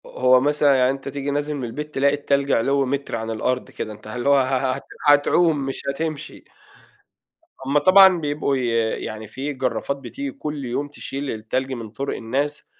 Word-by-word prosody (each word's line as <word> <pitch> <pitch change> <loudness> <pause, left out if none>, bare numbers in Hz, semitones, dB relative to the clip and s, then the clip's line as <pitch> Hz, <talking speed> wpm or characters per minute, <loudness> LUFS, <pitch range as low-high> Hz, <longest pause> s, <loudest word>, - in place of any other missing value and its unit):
ه - - -12
هو 130 0 +4
مثلًا 145 0 +3
يعني 125 -1 +3
أنت 135 0 -7
تيجي 140 +1 -3
نازل 145 +1 -1
من 135 - -5
البيت 150 +6 -6
تلاقي 140 +1 +3
التّلج 140 -1 0
علوّ 135 +4 +2
متر 140 0 -2
عن 115 0 -4
الأرض 125 +3 -1
كده. 110 - -5
أنت 105 - -14
هل 120 +4 -4
هو 140 - +6
ه - - +5
ه 130 0 0
هت 135 - -7 0.2
هتعوم 150 +3 +4
مش 135 - -4
هتمشي. 155 +1 -4 1.2
هُم 140 +2 +3
طبعًا 185 +3 +7
بيبقوا 145 -2 -1
ي 130 -2 -1 0.4
يعني 110 0 -6
في 135 +7 -4
جرّافات 130 +1 -2
بتيجي 275 - -6
كل 150 - -5
يوم 130 +4 -2
تشيل 140 -1 -5
التّلج 125 +5 -3
من 115 -4 -6
طرق 140 +5 -4
الناس، 140 +6 -2
140 Hz, 190 wpm, -22 LUFS, 130-145 Hz, 1.2 s, طبعًا